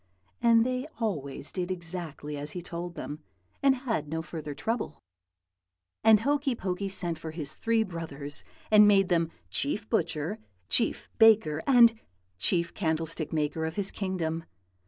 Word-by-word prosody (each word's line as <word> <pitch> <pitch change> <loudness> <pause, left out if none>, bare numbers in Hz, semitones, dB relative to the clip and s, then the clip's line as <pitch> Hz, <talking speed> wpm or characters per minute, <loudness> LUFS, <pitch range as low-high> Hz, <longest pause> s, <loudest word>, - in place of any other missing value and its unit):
and 230 -1 +5
they 255 +2 -2
always 145 - -3
did 180 -1 -3
exactly 170 -4 -5
as 145 +1 -5
he 180 - -5
told 170 0 -6
them, 150 -1 -6 0.4
and 275 -1 +5
had 220 - -1
no 160 +2 -3
further 155 -2 -6
trouble. 225 - -3 1.1
"And 220 -1 +6
Hokey 280 0 +1
Pokey 195 -1 -3
sent 175 -4 -1
for 160 - -6
his 155 -2 -5
three 230 -1 +2
brothers, 155 -6 -4 0.3
and 210 -1 +8
made 195 -2 +4
them 165 -2 +2 0.2
Chief 205 +10 -1
Butcher, 170 0 -1 0.3
Chief 230 - +3
Baker, 215 -9 +5
and 235 -4 +6 0.4
Chief 170 - +2
Candlestick 160 -3 -1
maker 155 0 -1
of 160 +1 -3
his 200 -2 +2
kingdom. 165 -4 -2
175 Hz, 145 wpm, -28 LUFS, 160-220 Hz, 1.1 s, and